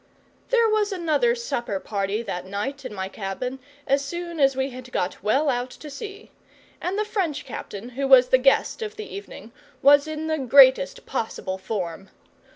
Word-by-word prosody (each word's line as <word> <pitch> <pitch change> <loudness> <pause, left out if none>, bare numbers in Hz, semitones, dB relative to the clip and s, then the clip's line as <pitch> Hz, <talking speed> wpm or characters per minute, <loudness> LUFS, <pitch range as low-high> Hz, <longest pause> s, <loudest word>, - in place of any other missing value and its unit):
There 470 -2 +4
was 430 -1 +1
another 360 +6 +1
supper 240 - -3
party 200 +2 -2
that 185 -4 -5
night, 255 +8 -4
in - - -5
my 190 -2 -4
cabin, 210 +7 -5 0.3
as 275 +1 +2
soon 340 +2 -5
as 270 -1 +4
we 265 +1 -1
had 255 0 -10
got 180 -5 -2
well 265 +10 +2
out 250 -2 0
to 300 +3 -11
sea; 405 +8 -9 0.5
and 370 +3 -2
the 425 - 0
French 375 -9 -2
captain, 205 +4 -7
who 270 +2 -2
was 255 -2 +7
the 260 - +5
guest 270 - +2
of 430 -1 -4
the 430 0 -6
evening, 400 - -9 0.3
was 285 +1 +6
in 310 0 -4
the 315 -1 -1
greatest 280 - +5
possible 190 -4 -3
form. 190 -2 -4
270 Hz, 175 wpm, -24 LUFS, 220-345 Hz, 0.5 s, was